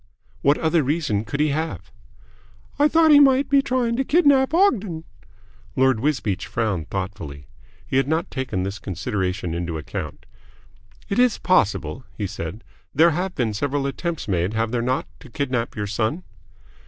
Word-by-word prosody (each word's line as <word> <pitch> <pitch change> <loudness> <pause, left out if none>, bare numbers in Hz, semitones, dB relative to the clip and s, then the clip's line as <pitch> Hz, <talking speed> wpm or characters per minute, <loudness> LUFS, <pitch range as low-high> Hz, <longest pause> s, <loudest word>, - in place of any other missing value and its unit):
"What 140 +2 +4
other 160 0 +2
reason 140 -7 -1
could 140 +7 -4
he 150 0 +3
have?" 160 +3 -3 0.9
"I 295 - +6
thought 320 0 +4
he 290 - +9
might 275 -1 +5
be 280 -1 +5
trying 250 -3 0
to 270 - +1
kidnap 285 -3 +4
Ogden." 215 - +2 0.7
Lord 130 -3 +3
Wisbeach 130 -8 -1
frowned 105 -8 -2
thoughtfully. 95 -8 -5 0.4
He 130 - -1
had 135 - +2
not 160 +2 -1
taken 130 -9 -2
this 100 +2 -4
consideration 90 -2 -3
into 85 -1 -3
account. 75 - -6 0.8
"It 200 - -1
is 250 -3 +4
possible," 130 - +1
he 105 - -2
said. 95 +2 -6 0.3
"There 165 +4 +6
have 180 +4 -2
been 115 -4 0
several 140 +5 -1
attempts 165 +4 -3
made, 90 +2 0
have 110 0 0
there 120 -1 0
not, 125 +2 0
to 130 - -14
kidnap 125 -2 -2
your 105 -2 -2
son?" 110 - -2
130 Hz, 160 wpm, -23 LUFS, -, 0.9 s, he